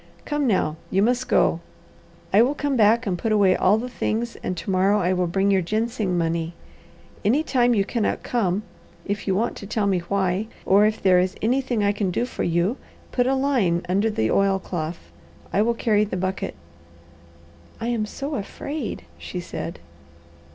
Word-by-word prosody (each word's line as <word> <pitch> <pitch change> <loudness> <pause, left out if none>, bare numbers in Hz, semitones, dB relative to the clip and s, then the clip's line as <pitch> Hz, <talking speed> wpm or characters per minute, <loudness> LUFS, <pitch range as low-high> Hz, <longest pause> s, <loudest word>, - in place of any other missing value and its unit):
Come 295 -2 0
now, 160 -7 +1
you 195 +2 +2
must 250 +3 +1
go. 165 - +3 0.7
I 205 - +7
will 265 +5 +2
come 285 -1 -1
back 230 +1 +4
and 180 -4 -1
put 225 - -1
away 200 -3 +4
all 195 +3 +3
the 240 +3 -3
things 235 -1 -2
and 180 - -3
tomorrow 190 +3 +2
I 185 -1 +1
will 180 -1 +1
bring 195 +3 +1
your 190 -1 +3
ginseng 215 0 -1
money. 165 0 -1 0.7
Any 265 +9 +3
time 245 -5 +2
you 200 -2 +2
cannot 225 0 -1
come, 205 -4 0 0.4
if 200 +1 -3
you 190 - +2
want 230 +5 0
to 200 - -8
tell 215 0 0
me 195 -2 +2
why, 190 +3 -1 0.2
or 205 +2 +5
if 215 0 -3
there 185 -2 +5
is 185 +1 0
anything 245 -1 +1
I 200 - +3
can 205 -2 -1
do 210 +7 0
for - - -6
you, 175 +8 +1 0.3
put 245 -1 +1
a 270 - +2
line 235 -11 +1
under 200 +5 +2
the 110 - 0
oilcloth. 185 -4 -1 0.4
I 205 - +3
will 235 +2 +2
carry 210 -3 +2
the 205 -3 -3
bucket." 185 +1 -3 1.2
"I 230 - -2
am 225 -3 -1
so 280 +7 -5
afraid," 275 - -5 0.2
she 85 - -6
said. 170 -1 -6
205 Hz, 180 wpm, -23 LUFS, 185-235 Hz, 1.2 s, I